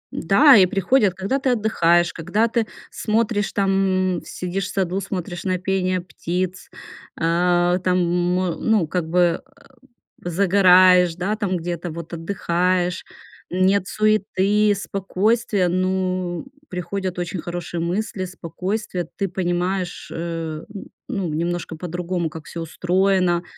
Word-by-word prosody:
Да, 260 Hz, -, +6 dB
и 185 Hz, -2 st, +6 dB
приходят, 195 Hz, +1 st, +2 dB
когда 195 Hz, +8 st, -1 dB
ты 265 Hz, -1 st, 0 dB
отдыхаешь, 175 Hz, -7 st, +2 dB
когда 185 Hz, +7 st, 0 dB
ты 230 Hz, -1 st, 0 dB, 0.2 s
смотришь, 215 Hz, -1 st, 0 dB
там, 190 Hz, -2 st, +1 dB
м, -, -, -6 dB
сидишь 180 Hz, +1 st, -4 dB
в -, -, -6 dB
саду, 190 Hz, 0 st, -1 dB
смотришь 180 Hz, -2 st, -5 dB
на 185 Hz, -1 st, 0 dB
пение 185 Hz, 0 st, 0 dB
птиц. 180 Hz, +1 st, -4 dB, 0.5 s
Э, 175 Hz, +2 st, +2 dB
там, 180 Hz, 0 st, +2 dB
м, 175 Hz, 0 st, 0 dB
ну, 215 Hz, -8 st, +2 dB
как 165 Hz, -1 st, -2 dB
бы, 175 Hz, -1 st, +2 dB
э, 275 Hz, +2 st, -25 dB, 0.6 s
загораешь, 180 Hz, -1 st, +5 dB
да, 190 Hz, +4 st, -1 dB
там 200 Hz, -4 st, -1 dB
где-то 175 Hz, 0 st, -4 dB
вот 170 Hz, +1 st, -8 dB
отдыхаешь. 180 Hz, +1 st, -1 dB, 0.4 s
Нет 185 Hz, +1 st, +2 dB
суеты, 210 Hz, -1 st, +2 dB
спокойствие. 200 Hz, +1 st, 0 dB
Ну, 185 Hz, 0 st, -1 dB, 0.2 s
приходят 185 Hz, +1 st, -4 dB
очень 175 Hz, +1 st, -3 dB
хорошие 175 Hz, -1 st, -5 dB
мысли, 185 Hz, +2 st, -2 dB
спокойствие. 180 Hz, +1 st, -4 dB
Ты 195 Hz, -, 0 dB
понимаешь, 180 Hz, 0 st, -2 dB
э, 165 Hz, -2 st, -4 dB
н 205 Hz, -2 st, -9 dB, 0.2 s
ну, 195 Hz, -8 st, -2 dB
немножко 170 Hz, +1 st, -2 dB
по-другому, 175 Hz, 0 st, -3 dB
как 155 Hz, 0 st, -10 dB
всё 170 Hz, -, -7 dB
устроено. 180 Hz, +1 st, +1 dB
185 Hz, 125 wpm, -22 LUFS, 175-195 Hz, 0.6 s, Да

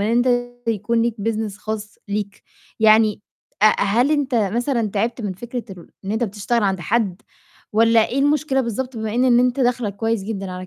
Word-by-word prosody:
أنت 235 Hz, +4 st, +2 dB, 0.4 s
يكون 230 Hz, +2 st, +1 dB
ليك 235 Hz, -1 st, 0 dB
business 215 Hz, -2 st, -2 dB
خاص 215 Hz, -1 st, -6 dB
ليك، 205 Hz, 0 st, -4 dB, 0.4 s
يعني 215 Hz, -1 st, +4 dB, 0.4 s
أ -, -, +8 dB, 0.2 s
هل 235 Hz, +8 st, +2 dB
أنت 280 Hz, -4 st, 0 dB
مثلًا 230 Hz, +3 st, 0 dB
تعبت 230 Hz, +4 st, -1 dB
من 205 Hz, -3 st, -2 dB
فكرة 240 Hz, +5 st, -6 dB
الر 180 Hz, -3 st, -11 dB, 0.2 s
إن 195 Hz, -, -4 dB
أنت 225 Hz, +2 st, 0 dB
بتشتغل 215 Hz, +3 st, -1 dB
عند 190 Hz, -2 st, 0 dB
حد 200 Hz, +1 st, -1 dB, 0.5 s
والّا 225 Hz, +1 st, +4 dB
إيه 265 Hz, -, -2 dB
المشكلة 290 Hz, -1 st, +2 dB
بالضبط، 250 Hz, +2 st, -4 dB
بما 220 Hz, 0 st, -3 dB
إن، 250 Hz, +2 st, +2 dB
إن 245 Hz, -1 st, +5 dB
أنت 250 Hz, +1 st, +1 dB
داخلَك 240 Hz, -5 st, 0 dB
كويس 225 Hz, -2 st, -1 dB
جدًا 195 Hz, -3 st, -4 dB
على 185 Hz, 0 st, -7 dB
225 Hz, 180 wpm, -21 LUFS, 205-240 Hz, 0.5 s, أ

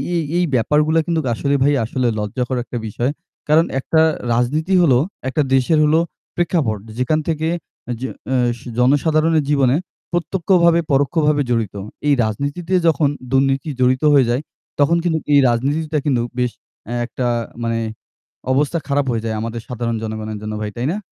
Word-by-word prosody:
এই 165 Hz, -, +1 dB
এই 180 Hz, -, +3 dB
ব্যাপারগুলো 150 Hz, +6 st, +2 dB
কিন্তু 165 Hz, -2 st, +1 dB
আসলে 140 Hz, +5 st, 0 dB
ভাই 145 Hz, +1 st, +3 dB
আসলে 125 Hz, +1 st, -1 dB
লজ্জাকর 125 Hz, +5 st, -2 dB
একটা 120 Hz, -, -6 dB
বিষয়। 120 Hz, +6 st, -1 dB, 0.4 s
কারণ 155 Hz, +2 st, +5 dB
একটা 160 Hz, +4 st, +1 dB, 0.3 s
রাজনীতি 150 Hz, +10 st, 0 dB
হলো 135 Hz, -8 st, +5 dB, 0.3 s
একটা 150 Hz, -, 0 dB
দেশের 135 Hz, +5 st, +3 dB
হল 150 Hz, +1 st, +3 dB, 0.4 s
প্রেক্ষাপট। 160 Hz, -, 0 dB, 0.2 s
যেখান 140 Hz, +5 st, +1 dB
থেকে 160 Hz, 0 st, -1 dB, 0.5 s
যে 130 Hz, -, -2 dB, 0.2 s
অ্যাস 120 Hz, -2 st, +1 dB, 0.2 s
জনসাধারণের 155 Hz, +4 st, +3 dB
জীবনে 135 Hz, -2 st, +3 dB, 0.4 s
প্রত্যক্ষভাবে 170 Hz, -1 st, +2 dB
পরোক্ষভাবে 145 Hz, +1 st, +2 dB
জড়িত। 115 Hz, -4 st, -1 dB, 0.3 s
এই 145 Hz, -, +5 dB
রাজনীতিতে 145 Hz, -, -3 dB
যখন 150 Hz, -2 st, +3 dB, 0.2 s
দুর্নীতি 135 Hz, +3 st, +1 dB
জড়িত 130 Hz, +3 st, +2 dB
হয়ে 135 Hz, -3 st, +5 dB
যায়। 125 Hz, +4 st, +1 dB, 0.4 s
তখন 160 Hz, +4 st, +4 dB
কিন্তু 165 Hz, -2 st, +1 dB, 0.2 s
এই 140 Hz, -, +7 dB
রাজনীতিটা 150 Hz, +6 st, 0 dB
কিন্তু 130 Hz, -5 st, +2 dB, 0.2 s
বেশ 125 Hz, -1 st, +1 dB, 0.4 s
এ -, -, -2 dB
একটা 125 Hz, 0 st, -3 dB, 0.4 s
মানে 115 Hz, 0 st, 0 dB, 0.7 s
অবস্থা 145 Hz, +5 st, +1 dB
খারাপ 140 Hz, 0 st, +1 dB
হয়ে 115 Hz, -1 st, -2 dB
যায় 110 Hz, -1 st, -2 dB
আমাদের 115 Hz, 0 st, -4 dB
সাধারণ 115 Hz, -1 st, -2 dB
জনগণের 110 Hz, -1 st, -4 dB
জন্য 105 Hz, 0 st, -5 dB
ভাই। 105 Hz, -1 st, -3 dB
তাই 125 Hz, +3 st, -1 dB
না? 200 Hz, -, -2 dB
140 Hz, 155 wpm, -19 LUFS, 120-155 Hz, 0.7 s, এই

